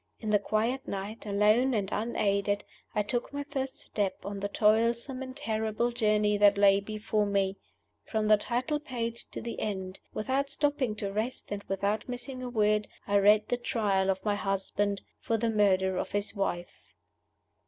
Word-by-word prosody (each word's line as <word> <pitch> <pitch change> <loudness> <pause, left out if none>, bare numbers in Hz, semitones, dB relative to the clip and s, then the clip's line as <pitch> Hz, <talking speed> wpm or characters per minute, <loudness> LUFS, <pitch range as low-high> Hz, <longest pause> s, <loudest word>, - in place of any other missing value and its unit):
In 215 -2 -2
the 205 - +5
quiet 225 +6 -1
night, 200 +3 -5
alone 215 +6 +3
and 200 -2 0
unaided, 205 -2 0 0.3
I 210 - +2
took 240 +3 -2
my 285 0 -3
first 270 -2 -4
step 200 -3 -2
on 200 0 -4
the 200 +1 -2
toilsome 230 +5 +2
and 260 -1 -7
terrible 220 +2 -1
journey 210 -2 +2
that 205 0 +6
lay 200 -1 +6
before 215 0 -1
me. 195 -1 +1 0.5
From 220 -1 -1
the 215 - +7
title 250 +7 -1
page 235 -5 -4
to - - -6
the 235 - -5
end, 190 -2 -3
without 270 +5 -1
stopping 280 -5 0
to 200 -2 -4
rest 220 +3 -3
and 205 -1 -3
without 200 +4 -1
missing 255 +1 -5
a 250 - -4
word, 210 -2 +2 0.2
I 205 - +3
read 210 +1 +5
the 245 - +1
Trial 200 -5 +1
of 190 +1 -1
my 210 - +2
husband 200 0 -1 0.2
for 225 - 0
the 225 +1 0
murder 190 -3 +3
of - - -3
his 205 0 -1
wife. 175 -3 -4
215 Hz, 175 wpm, -29 LUFS, 200-235 Hz, 0.5 s, the